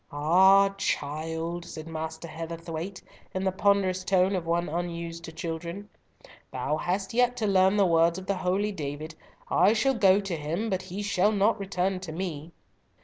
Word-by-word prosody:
"Ah, 190 +7 +5
child!" 160 +1 -2
said 160 -2 -8
Master 160 0 -5
Heatherthwayte, 165 +3 -6 0.3
in 185 - -1
the 190 - +1
ponderous 190 -1 +2
tone 190 +1 +2
of 170 -3 -3
one 170 +1 +1
unused 170 0 -4
to 160 - -8
children, 170 +5 -6 0.6
"thou 150 - -1
hast 190 +5 -2
yet 245 +1 +2
to 225 - -1
learn 190 0 +4
the 200 - +5
words 170 0 +3
of 190 - -7
the 200 -1 -1
holy 190 +4 0
David, 155 -2 -5 0.4
'I 200 +4 +5
shall 270 +4 +2
go 195 -5 +5
to 195 -4 -3
him, 165 +9 -3
but 190 -1 0
he 190 +2 -6
shall 200 0 +2
not 210 +2 +2
return 190 -1 -1
to 185 -3 -7
me.'" 165 -2 -5
180 Hz, 170 wpm, -27 LUFS, 165-195 Hz, 0.6 s, Ah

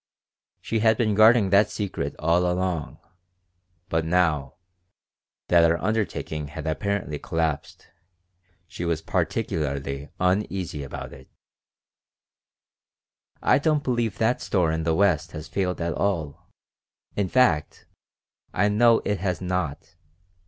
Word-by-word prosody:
She 115 - -1
had 110 0 +3
been 110 -3 +1
guarding 110 -1 +5
that 100 +1 +5
secret 100 -3 -4
all 85 +3 +2
along, 90 -4 -2 0.9
but 80 0 0
now, 80 -5 +1 0.9
that 85 -1 +6
our 85 0 +4
undertaking 95 -7 -2
had 75 +2 -8
apparently 80 -2 -2
collapsed, 80 -3 -3 0.8
she 90 - -7
was 85 -2 -1
particularly 70 -2 -2
uneasy 90 -4 -1
about 70 - -7
it 65 - -14 2.1
"I - - +4
don't 150 -1 +1
believe 120 -5 -1
that 120 +2 +1
store 90 -5 +1
in 80 0 -2
the 80 -1 +2
West 90 -5 +2
has 75 0 -7
failed 90 0 -2
at 85 -1 -1
all. 80 -6 -2 0.7
In 100 -3 0
fact, 85 -12 +2 0.7
I 105 +3 +3
know 115 +2 +4
it 105 -1 0
has 90 -3 -1
not. 90 -3 -3
90 Hz, 120 wpm, -25 LUFS, 80-105 Hz, 2.1 s, that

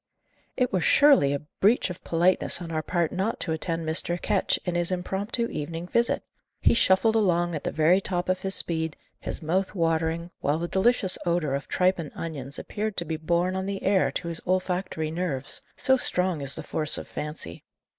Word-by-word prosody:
It 250 -4 +1
were 185 - +2
surely 275 - +5
a 145 +1 -3
breach 205 -1 +3
of 175 - -10
politeness 175 +2 +2
on 170 -2 -6
our 155 -1 -1
part 170 0 0
not 195 +5 -1
to 165 - -1
attend 165 +1 -2
Mr. 170 +2 0
Ketch - - +1
in 180 - -1
his 175 0 +1
impromptu 195 +6 -1
evening 165 +3 -4
visit! 235 +4 +1 0.4
He - - +4
shuffled 220 0 +4
along 175 -5 +2
at 150 - -4
the - - 0
very 165 +5 +4
top 180 -2 -2
of 185 0 +1
his 195 0 -1
speed, 160 -2 0 0.2
his - - -5
mouth 185 +6 0
watering, 165 0 0
while 145 +2 +1
the 170 +1 -2
delicious 190 0 +2
odour 170 -5 0
of 140 +1 -3
tripe 185 0 +2
and 155 -3 -5
onions 145 -4 -4
appeared 215 -1 -4
to 170 - -1
be 160 0 -2
borne 170 +3 0
on 190 0 -2
the 195 -1 -4
air 195 -1 +3
to 170 - -3
his 165 -1 -4
olfactory 180 -3 -1
nerves: 160 -6 -3 0.2
so 265 0 +4
strong 180 - -1
is 140 -1 -4
the 160 - -4
force 155 0 -2
of - - -7
fancy. 150 - -6
175 Hz, 195 wpm, -26 LUFS, 160-190 Hz, 0.4 s, surely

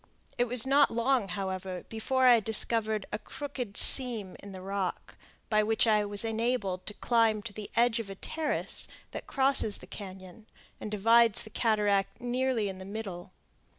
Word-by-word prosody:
It 245 - +1
was 245 -1 +2
not 280 +2 +4
long, 235 -1 0
however, 190 -2 -5
before 260 +4 -1
I 245 -2 +7
discovered 220 -1 0
a 210 - -3
crooked 265 -7 -7
seam 230 -8 +5
in 200 - -11
the 190 - -9
rock, 190 -1 -4 0.3
by 215 -1 +2
which 220 +2 +2
I 210 -2 +2
was 205 +2 -1
enabled 220 -5 -2
to 210 - -4
climb 225 -3 +1
to 230 - -7
the 210 0 -8
edge 235 0 +2
of 220 -3 -6
a 195 - -7
terrace 310 +9 -3 0.2
that - - -8
crosses 265 -6 +2
the - - -12
cañon, 190 +1 -11 0.3
and - - -6
divides 225 +1 +3
the 215 - -12
cataract 205 -3 0
nearly 245 -2 -1
in 190 -1 -7
the - - -8
middle. 195 -3 -7
220 Hz, 170 wpm, -29 LUFS, 200-240 Hz, 0.3 s, I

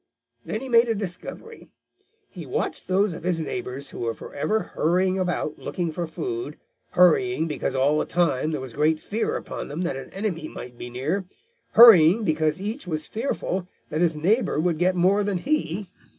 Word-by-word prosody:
Then - - -4
he 265 - -5
made 235 -1 +4
a 225 - +1
discovery. 205 - -6 0.6
He - - -10
watched - - -3
those 190 +1 +2
of 165 - -8
his 175 0 0
neighbors 140 -5 -5
who - - -9
were 115 -1 -2
forever 215 +9 -3
hurrying 185 +4 +1
about 175 -4 -2
looking 175 -3 -3
for 170 +2 -3
food, 360 - -5 0.4
hurrying 180 -1 +4
because 145 -3 -3
all 140 +3 +3
the - - 0
time 155 -5 +1
there 155 - -3
was 130 -3 -8
great 155 +2 +2
fear 220 +7 -2
upon - - -6
them 150 +5 -5
that 175 -6 -1
an 135 - -7
enemy 190 -6 -3
might 125 -4 -9
be 120 - -8
near, 150 +11 -2 0.5
hurrying 220 -3 +8
because 155 -2 +1
each 205 0 -5
was 155 -3 -3
fearful 205 -6 -3 0.2
that 155 +2 -1
his 165 -3 +2
neighbor 190 +2 +1
would 165 -1 0
get 185 +1 +2
more 190 +4 +3
than 200 -2 -1
he. 205 - -1
175 Hz, 180 wpm, -24 LUFS, 155-200 Hz, 0.6 s, hurrying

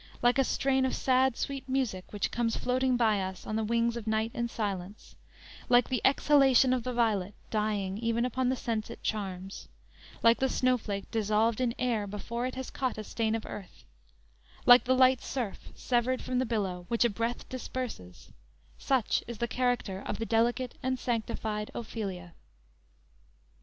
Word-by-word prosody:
Like 245 +2 +4
a - - +6
strain 265 0 +1
of 260 - 0
sad, 260 -1 +2
sweet 275 -1 -4
music 250 -9 -1
which 205 -2 -2
comes 230 -1 0
floating 255 0 +1
by 220 -4 +3
us 190 0 -5
on 215 - -3
the 220 - 0
wings 235 +1 +1
of 230 -2 -6
night 220 +1 0
and 235 0 -2
silence, 200 -3 -5 0.5
like 245 -1 +5
the 255 -2 0
exhalation 270 -2 +5
of 255 - 0
the 255 - -2
violet 210 -5 0 0.2
dying 210 -2 -1
even 230 +1 0
upon 255 +1 0
the 260 - +1
sense 225 -3 -3
it - - -10
charms, 195 -2 -4 0.6
like 230 0 +5
the 265 - +2
snowflake 225 -7 0
dissolved 220 +2 +1
in 240 -1 0
air 235 -5 0
before 235 +5 -3
it 255 - -6
has 260 0 -5
caught 260 -4 -2
a 215 - -4
stain 220 +1 -1
of 225 - -4
earth; 195 -3 -9 0.8
like 245 0 +8
the 260 +1 +3
light 255 -1 +5
surf, 240 -7 -4
severed 250 +1 0
from 255 -1 -1
the 255 - 0
billow, 190 -6 -2
which 235 0 +2
a - - +4
breath 230 +3 -3
disperses, 250 - -6 0.5
such 260 -5 +1
is 235 -1 -6
the 235 - -1
character 245 -6 -1
of - - -2
the 225 - -3
delicate 240 +3 0
and 260 0 -1
sanctified 220 -3 -2
Ophelia." 195 -7 -5
235 Hz, 175 wpm, -30 LUFS, 215-255 Hz, 0.8 s, like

